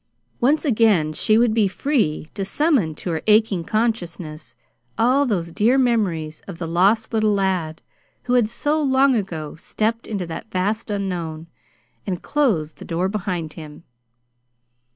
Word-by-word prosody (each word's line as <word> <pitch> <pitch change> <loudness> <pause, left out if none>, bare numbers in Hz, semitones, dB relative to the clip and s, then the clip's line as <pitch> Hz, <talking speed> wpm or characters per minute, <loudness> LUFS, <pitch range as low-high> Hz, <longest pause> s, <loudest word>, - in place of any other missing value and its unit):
Once 290 +7 +2
again 210 - +3
she 215 +7 +2
would 235 -1 +3
be 215 -3 +3
free 190 - -1
to 200 - -3
summon 210 - +1
to 175 - -4
her 160 - -2
aching 215 -4 +3
consciousness 175 -7 -3 0.4
all 260 +5 +3
those 175 -7 -1
dear 225 +8 +3
memories 190 - 0
of 190 -4 -7
the 165 - -4
lost 200 +8 +2
little 215 -2 +2
lad 185 -5 -1 0.4
who 250 - -1
had 240 -4 +3
so 295 +6 0
long 270 -1 +3
ago 170 -9 -3
stepped 220 +5 -2
into 200 -4 -3
that 165 +6 -7
vast 210 +5 -1
unknown 175 -6 -3 0.6
and 180 -3 -3
closed 210 - 0
the - - -8
door 175 +2 -1
behind 180 -6 -3
him. 155 0 -11
200 Hz, 150 wpm, -22 LUFS, 165-230 Hz, 0.6 s, again